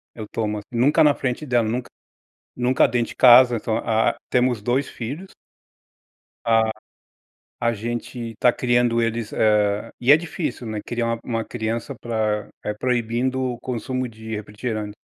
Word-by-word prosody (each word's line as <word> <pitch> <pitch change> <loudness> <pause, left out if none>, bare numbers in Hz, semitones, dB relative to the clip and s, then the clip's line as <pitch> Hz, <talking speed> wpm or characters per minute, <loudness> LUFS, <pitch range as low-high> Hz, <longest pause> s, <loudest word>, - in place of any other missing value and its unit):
eu 110 - -6
tomo 105 -2 -2
assim, 105 - -14
nunca 125 +7 +4
na 150 -1 +5
frente 130 +3 -3
dela, 120 -4 +1
nunca 120 +2 -3 0.7
nunca 125 +1 +3
dentro 120 -1 -1
de - - -10
casa, 125 -1 +7
então 110 0 -1
ah 110 0 +1
temos 125 -3 +2
2 125 +5 0
filhos. 145 +12 -7 1.2
Ah, 115 -1 +3 0.9
a 115 0 +2
gente 120 +1 -5
tá 125 - +5
criando 120 -1 +1
eles, 115 -1 -2
eh, 105 -1 +2
e 125 +3 +5
é 150 - +9
difícil, 160 -5 -4
né, 110 -1 -4
criar 120 -1 -2
uma 115 0 -1
uma 115 -2 -2
criança 115 +3 -3
pra 110 -3 -2 0.2
é 105 - -1
proibindo 125 +2 -1
o 125 -2 -2
consumo 130 +1 -3
de 110 0 -7
refrigerante. 105 0 -5
120 Hz, 155 wpm, -22 LUFS, 110-125 Hz, 1.2 s, é